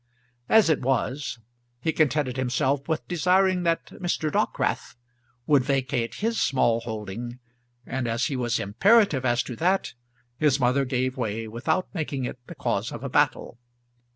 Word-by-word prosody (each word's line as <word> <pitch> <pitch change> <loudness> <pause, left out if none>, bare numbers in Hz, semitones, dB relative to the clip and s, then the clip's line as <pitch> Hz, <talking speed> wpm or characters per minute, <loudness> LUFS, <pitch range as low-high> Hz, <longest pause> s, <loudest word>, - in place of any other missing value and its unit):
As 220 -4 +6
it 160 -3 +2
was 130 +1 -1 0.4
he 160 +6 -1
contented 145 -4 +1
himself 130 +2 0
with 160 -1 -2
desiring 185 +2 +2
that 165 -1 0 0.2
Mr. 165 -3 -1
Dockwrath - - -1 0.5
would 145 -4 +4
vacate 130 -3 -1
his 225 +2 -1
small 120 -4 +2
holding, 115 +2 -6 0.5
and 130 -2 -3
as 115 +2 0
he 140 - -2
was 120 -3 0
imperative 150 - +3
as 120 -1 +2
to 125 - -7
that 185 +3 +1 0.5
his 145 -3 +3
mother 130 +2 +2
gave 130 0 -1
way 110 -2 -3
without 155 +11 -1
making 145 -7 -3
it 125 - -6
the - - -9
cause - - -1
of - - -7
a - - -3
battle. 120 - +1
135 Hz, 155 wpm, -25 LUFS, 120-160 Hz, 0.5 s, As